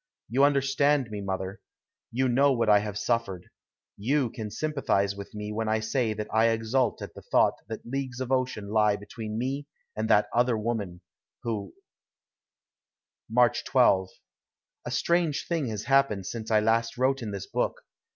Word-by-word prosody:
You 130 +5 +3
understand 140 -2 +2
me, 105 -1 -4
mother. 95 +1 -4 0.5
You 130 +3 +1
know 135 +3 +4
what 115 -3 +1
I 105 -1 +7
have 105 -1 -4
suffered. 105 -5 -1 0.5
You 125 +3 +1
can 110 -4 -6
sympathize 105 -8 0
with 100 +1 -9
me 105 0 -5
when 110 0 -2
I 110 0 +2
say 110 +1 0
that 105 0 -4
I 110 +1 +4
exult 115 +3 0
at - - -8
the - - -11
thought - - +3
that - - -7
leagues 130 0 -4
of 130 0 -4
ocean 130 -6 -1
lie 105 -1 +3
between 105 +1 -6
me 135 +4 -2 0.3
and 110 +1 -2
that 105 0 +4
other 120 -1 +2
woman, 105 -6 -3 0.4
who 105 -4 -4 1.5
March 120 +1 +3
12. 95 -8 +3 0.8
A - - -2
strange 170 -4 +1
thing 165 -6 -1
has 110 -2 -4
happened 130 -6 +2
since 110 +1 -5
I 110 -1 +4
last 115 +2 +1
wrote 135 +1 +1
in 110 - -4
this 100 -1 -5
book. - - -2
115 Hz, 165 wpm, -27 LUFS, 105-130 Hz, 1.5 s, I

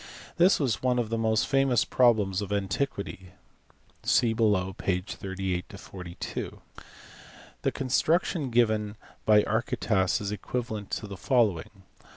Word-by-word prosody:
This 180 +2 +5
was 120 - 0
one 125 -1 +1
of 120 -3 -1
the 115 - 0
most 110 0 +2
famous 135 -4 +3
problems 105 -6 +3
of 100 -1 -5
antiquity 100 -2 -3 0.7
(see 115 -3 +3
below, 105 -4 +1
pp. 90 -1 -2
38, 95 0 -4
42). 90 -4 -7 1.0
The - - +1
construction 150 +3 +1
given 110 -3 +1 0.3
by 105 -1 +6
Archytas 110 -3 0
is 100 -1 -3
equivalent 110 -1 -4
to - - -3
the 100 -2 -8
following. 105 - 0
105 Hz, 125 wpm, -27 LUFS, 95-120 Hz, 1.0 s, by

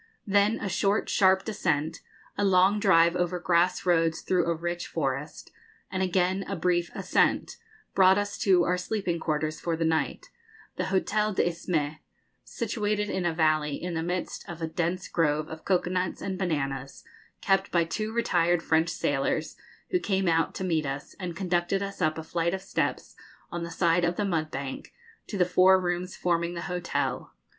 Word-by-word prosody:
Then 205 +2 +3
a - - -3
short 195 +2 +1
sharp 190 -1 +4
descent, 165 -7 -1 0.4
a 205 - -1
long 195 +1 +4
drive 170 -4 +4
over 180 0 0
grass 175 +1 +1
roads 165 -2 +2
through 180 -2 +1
a 170 - +1
rich 175 +1 -4
forest, 140 -1 -3 0.4
and 190 - -2
again 185 +1 +1
a 195 - -3
brief 175 0 +1
ascent, - - +1 0.4
brought 190 0 +6
us 205 0 -2
to 185 -3 +4
our 180 +1 +1
sleeping 180 -3 -2
quarters 155 -1 -2
for 165 -1 -2
the 165 - 0
night, 160 - -1 0.4
the 185 - -2
Hotel 205 +2 0
de - - +3
l'Isthme, 160 -3 -2 0.4
situated 210 - -2
in 180 -2 -1
a - - +1
valley 155 -2 +2
in 175 +3 -5
the 165 - -1
midst 175 +1 -3
of 170 -1 -7
a 165 - -2
dense 175 +2 -2
grove 155 -2 +1
of 160 0 -9
cocoa 180 -2 +1
nuts 185 -1 -1
and 190 -1 -3
bananas, 135 -7 -3 0.4
kept 195 0 +1
by 170 -1 +3
two 215 +7 -3
retired 175 -7 +1
French 160 +1 +2
sailors, 145 +3 -1 0.4
who 365 - +2
came 195 - 0
out 165 -1 +1
to - - -4
meet 160 -5 0
us, 135 +1 -5
and 180 -3 -5
conducted 180 +1 0
us 200 -1 -6
up 155 -1 +1
a 160 - -5
flight 170 +2 -1
of 190 - -8
steps - - -2 0.4
on 175 - -4
the 170 - -4
side 170 0 +2
of 175 +2 0
a 205 - +1
mud 160 -5 -1
bank 135 -1 -6 0.3
to 205 - -4
the 180 - +4
four 185 +1 +5
rooms 180 0 -2
forming 170 0 0
the 170 - -4
hotel. 180 -1 -3
175 Hz, 180 wpm, -27 LUFS, 165-190 Hz, 0.4 s, brought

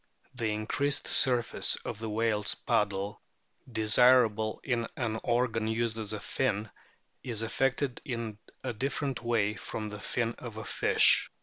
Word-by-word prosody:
The 115 -4 -2
increased 135 +7 0
surface 120 -4 +4
of - - -5
the 110 0 -4
whale's 105 -1 +1
paddle, 100 0 -1 0.5
desirable 110 -1 +4
in 120 -3 -1
an 110 -2 -2
organ 120 -2 0
used 115 0 -1
as 110 -1 -2
a 105 - -3
fin, 105 +2 -1 0.5
is 115 -3 -2
affected 135 +2 -1
in 115 -6 -5 0.2
a - - -3
different 135 +3 -2
way 115 -3 +1
from 105 +2 -6
the 105 0 -8
fin 120 +1 -2
of 120 -4 -8
the 110 0 -7
fish. - - +4
115 Hz, 140 wpm, -29 LUFS, 105-125 Hz, 0.5 s, surface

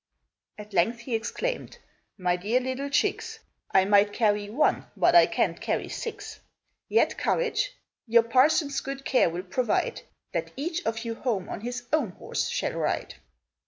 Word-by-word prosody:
At 210 0 -11
length 225 +7 +2
he 235 +1 -6
exclaimed, 235 - -3 0.4
"My 180 -2 +1
dear 210 +8 +1
little 260 +2 -3
chicks, 430 +9 0 0.3
I 190 - +4
might 205 0 +4
carry 210 -2 +1
one, 255 +9 +1
but 350 - +4
I 345 - +8
can't - - 0
carry - - -1
six! 460 - -6 0.5
Yet - - +2
courage! - - 0 0.3
Your 230 0 +5
parson's 280 +4 +3
good 275 0 -6
care 255 - +3
will 175 +2 -5
provide 245 - -1 0.3
That - - -3
each 330 +5 -2
of 225 +1 -2
you 230 - -2
home 225 -6 -2
on - - -5
his 245 +2 -4
own 265 -12 +1
horse - - -3
shall - - -1
ride!" - - -2
240 Hz, 160 wpm, -27 LUFS, 210-285 Hz, 0.5 s, I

